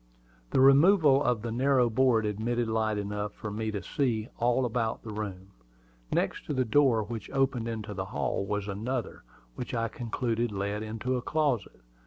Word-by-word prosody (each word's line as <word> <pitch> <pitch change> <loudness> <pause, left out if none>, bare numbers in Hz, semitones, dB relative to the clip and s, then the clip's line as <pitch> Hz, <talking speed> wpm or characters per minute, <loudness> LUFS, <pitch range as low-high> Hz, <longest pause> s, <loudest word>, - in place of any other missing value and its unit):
The - - +1
removal 140 +1 +6
of 120 -3 0
the 115 - -3
narrow 130 +1 +3
board 115 -1 +3
admitted 115 +3 -1
light 110 -1 0
enough 105 0 -3
to - - -4
enable 105 - -6
me 110 0 -1
to 100 -4 -4
see 115 0 -1
all 120 +2 +2
about 115 -1 -1
the 110 - -7
room. 100 -3 -6 0.6
Next - - 0
to 145 - -2
the 130 -1 +1
door 120 -2 +3
which 115 +2 -6
opened 135 -4 0
into 110 -2 -4
the 95 -1 -4
hall 100 - -2
was 105 0 -2
another, 115 +3 -3 0.3
which - - -5
I 115 -1 0
concluded 115 +1 -2
led 100 +1 -2
into 115 +4 -2
a - - -3
closet. 135 - -1
115 Hz, 180 wpm, -29 LUFS, 105-125 Hz, 0.6 s, removal